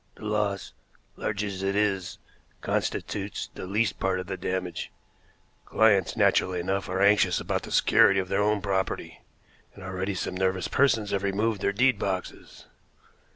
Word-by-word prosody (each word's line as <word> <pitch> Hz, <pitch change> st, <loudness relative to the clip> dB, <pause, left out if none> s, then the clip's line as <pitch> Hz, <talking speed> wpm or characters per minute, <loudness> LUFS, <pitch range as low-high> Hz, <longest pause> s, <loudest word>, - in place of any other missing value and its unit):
"The -, -, -11 dB
loss, 105 Hz, -2 st, -1 dB, 0.4 s
large 105 Hz, -1 st, -2 dB
as 100 Hz, -2 st, -4 dB
it 100 Hz, 0 st, -1 dB
is, 100 Hz, -3 st, 0 dB, 0.4 s
constitutes 100 Hz, 0 st, -3 dB
the -, -, -7 dB
least 105 Hz, +1 st, 0 dB
part 95 Hz, -1 st, 0 dB
of 90 Hz, -, -5 dB
the 95 Hz, +1 st, -4 dB
damage. 90 Hz, -1 st, -4 dB, 0.8 s
Clients, 100 Hz, -6 st, +3 dB
naturally 90 Hz, -1 st, +2 dB
enough, 95 Hz, +2 st, -2 dB
are 95 Hz, +1 st, 0 dB
anxious 100 Hz, -3 st, +4 dB
about -, -, -2 dB
the -, -, -10 dB
security 105 Hz, -4 st, +5 dB
of 95 Hz, -, -2 dB
their 100 Hz, +2 st, 0 dB
own 105 Hz, 0 st, +1 dB
property, 95 Hz, -1 st, -2 dB, 0.5 s
and 100 Hz, -, -11 dB
already 95 Hz, +1 st, -3 dB
some 90 Hz, -, -3 dB
nervous 95 Hz, 0 st, 0 dB
persons 115 Hz, -6 st, +2 dB
have 100 Hz, -, 0 dB
removed 100 Hz, +1 st, 0 dB
their -, -, +1 dB
deed 120 Hz, +1 st, +2 dB
boxes." 95 Hz, -2 st, -5 dB
100 Hz, 155 wpm, -27 LUFS, 95-105 Hz, 0.8 s, security